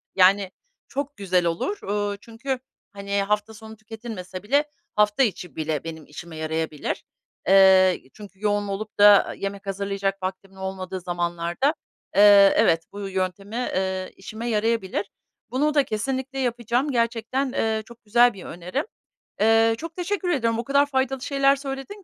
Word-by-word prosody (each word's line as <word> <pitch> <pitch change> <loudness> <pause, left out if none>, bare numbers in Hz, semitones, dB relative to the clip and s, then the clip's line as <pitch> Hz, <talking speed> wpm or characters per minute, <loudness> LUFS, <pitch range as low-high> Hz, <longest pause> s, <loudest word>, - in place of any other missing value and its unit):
yani, 190 +1 +4 0.4
çok 280 +1 -4
güzel 185 -3 +1
olur. 280 - -2
Uuu, 205 0 -1
çünkü, 235 +5 -5 0.3
hani, 200 0 -2
hafta 210 +2 -1
sonu 220 0 -11
tüketilmese 215 -4 -8
bile 280 +8 +3 0.3
hafta 210 +4 +3
içi 180 - -3
bile 155 -2 -2
benim 160 -2 -7
işime 165 +3 -10
yarayabilir. 160 -1 -3 0.4
Eee, 190 -1 +6
çünkü 200 -2 -13
yoğun 205 -1 0
olup 200 +2 -5
da 205 -1 +7
yemek 200 0 -5
hazırlayacak 195 0 -2
vaktimin 190 +1 -5
olmadığı 190 -1 -5
zamanlarda, 175 - -1 0.4
eee, 200 -1 +8
evet, 165 -1 +4
bu 200 -1 -6
yöntemi, 190 +2 -3
eee, 190 -6 -2
işime 220 +5 -6
yarayabilir. 210 -3 0 0.4
Bunu 295 +4 +1
da 290 -2 +4
kesinlikle 265 +4 -3
yapacağım. 245 +2 0
Gerçekten, 240 +2 0
eee, 220 -3 0
çok 235 0 -15
güzel 240 +3 +4
bir 190 -2 -11
önerim. 180 - -4 0.6
Eee, 225 +1 +5
çok 330 +5 -7
teşekkür 365 +1 -2
ediyorum. 230 -8 +1
O - - -1
kadar 280 +3 +3
faydalı 265 -2 -1
şeyler 275 0 +3
söyledin 275 +9 -7
210 Hz, 145 wpm, -24 LUFS, 190-245 Hz, 0.6 s, eee